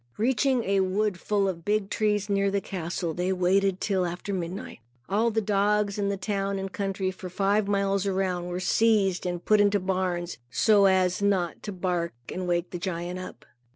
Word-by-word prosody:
Reaching 250 Hz, +2 st, +2 dB
a 195 Hz, -1 st, +1 dB
wood 190 Hz, 0 st, 0 dB
full 200 Hz, -2 st, +1 dB
of 170 Hz, -3 st, -4 dB
big 205 Hz, 0 st, 0 dB
trees 210 Hz, -2 st, +1 dB
near 200 Hz, -1 st, +1 dB
the 200 Hz, 0 st, 0 dB
castle, 175 Hz, -3 st, -4 dB
they 180 Hz, +2 st, -1 dB
waited 190 Hz, +1 st, +2 dB
till 190 Hz, -3 st, 0 dB
after 180 Hz, +3 st, -4 dB
midnight. 180 Hz, -4 st, -5 dB, 0.3 s
All 220 Hz, +4 st, +2 dB
the 220 Hz, 0 st, 0 dB
dogs 205 Hz, 0 st, +1 dB
in 200 Hz, -1 st, 0 dB
the 200 Hz, -, -1 dB
town 195 Hz, 0 st, -2 dB
and 195 Hz, 0 st, -5 dB
country, 195 Hz, -1 st, -2 dB
for 185 Hz, 0 st, -8 dB
five 200 Hz, +2 st, +1 dB
miles 200 Hz, -1 st, +1 dB
around, 185 Hz, -2 st, -1 dB
were 180 Hz, 0 st, -3 dB
seized 195 Hz, -2 st, +2 dB
and 175 Hz, -1 st, -4 dB
put 215 Hz, -1 st, +5 dB
into 205 Hz, 0 st, +3 dB
barns, 180 Hz, -3 st, -2 dB
so 205 Hz, -, +4 dB
as 185 Hz, -1 st, +3 dB
not 190 Hz, -5 st, 0 dB
to 210 Hz, -, -5 dB
bark 180 Hz, -2 st, -2 dB, 0.2 s
and 185 Hz, 0 st, -4 dB
wake 175 Hz, 0 st, 0 dB
the 175 Hz, -, -4 dB
giant 175 Hz, -1 st, -3 dB
up. 185 Hz, -, -9 dB
195 Hz, 190 wpm, -27 LUFS, 180-205 Hz, 0.3 s, put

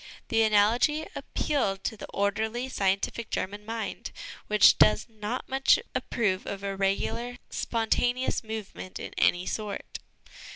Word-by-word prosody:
The 225 Hz, -1 st, +3 dB
analogy 225 Hz, +9 st, +3 dB
appealed 195 Hz, -10 st, -1 dB
to -, -, -2 dB
the 210 Hz, -, -9 dB
orderly, 220 Hz, +5 st, -1 dB
scientific 200 Hz, +1 st, 0 dB
German 205 Hz, +2 st, -3 dB
mind, 225 Hz, +1 st, -5 dB, 0.4 s
which 210 Hz, 0 st, +6 dB
does 215 Hz, -, +5 dB
not 220 Hz, +2 st, -5 dB
much 270 Hz, 0 st, +4 dB, 0.2 s
approve 205 Hz, -5 st, -1 dB
of 200 Hz, 0 st, -5 dB
irregular, 200 Hz, +5 st, -1 dB
spontaneous 245 Hz, +3 st, 0 dB
movement 215 Hz, -4 st, -6 dB
in -, -, -7 dB
any 180 Hz, +1 st, +3 dB
sort. 210 Hz, -1 st, -4 dB
215 Hz, 120 wpm, -28 LUFS, 200-235 Hz, 0.4 s, which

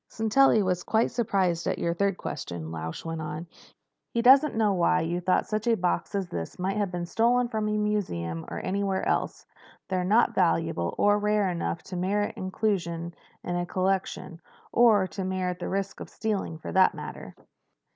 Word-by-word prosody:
"Sintelli 225 Hz, 0 st, +3 dB
was 180 Hz, -1 st, 0 dB
quite 220 Hz, +1 st, +1 dB
surprised 195 Hz, -8 st, 0 dB
at -, -, 0 dB
your 170 Hz, -, 0 dB
third 195 Hz, +1 st, 0 dB
question," 85 Hz, -, -6 dB
Lausch 80 Hz, -, -6 dB
went 165 Hz, -1 st, -4 dB
on. 155 Hz, +2 st, -5 dB, 0.6 s
"He 235 Hz, -, -1 dB
doesn't 270 Hz, +2 st, +6 dB
know 215 Hz, -2 st, +2 dB
why 180 Hz, 0 st, +2 dB
you 170 Hz, +2 st, -2 dB
thought 185 Hz, +1 st, +2 dB
such 215 Hz, +1 st, -3 dB
a 230 Hz, -1 st, +3 dB
box 180 Hz, +3 st, -1 dB
as 195 Hz, -2 st, -1 dB
this 80 Hz, -1 st, -5 dB
might 190 Hz, +3 st, -1 dB
have 205 Hz, -3 st, 0 dB
been 175 Hz, -1 st, -3 dB
stolen 240 Hz, +6 st, +2 dB
from 215 Hz, -2 st, -1 dB
a 210 Hz, -, 0 dB
museum 85 Hz, -, -2 dB
or -, -, -5 dB
anywhere 195 Hz, 0 st, -1 dB
else. -, -, -1 dB, 0.4 s
They're 185 Hz, -1 st, 0 dB
not 220 Hz, +5 st, +3 dB
valuable 165 Hz, -, +1 dB
or 205 Hz, 0 st, +4 dB
rare 210 Hz, -1 st, +2 dB
enough 170 Hz, -1 st, -3 dB
to 185 Hz, -, -8 dB
merit 205 Hz, +3 st, 0 dB
inclusion 175 Hz, -4 st, -2 dB, 0.3 s
in 175 Hz, -, -3 dB
a 175 Hz, 0 st, -1 dB
collection—or 190 Hz, +3 st, +1 dB
to 190 Hz, +1 st, -5 dB
merit 185 Hz, -1 st, -2 dB
the -, -, -4 dB
risk 195 Hz, 0 st, -3 dB
of -, -, -8 dB
stealing, 205 Hz, -7 st, -3 dB
for 155 Hz, -, -7 dB
that 190 Hz, 0 st, +4 dB
matter." -, -, -8 dB
190 Hz, 175 wpm, -27 LUFS, 170-210 Hz, 0.6 s, doesn't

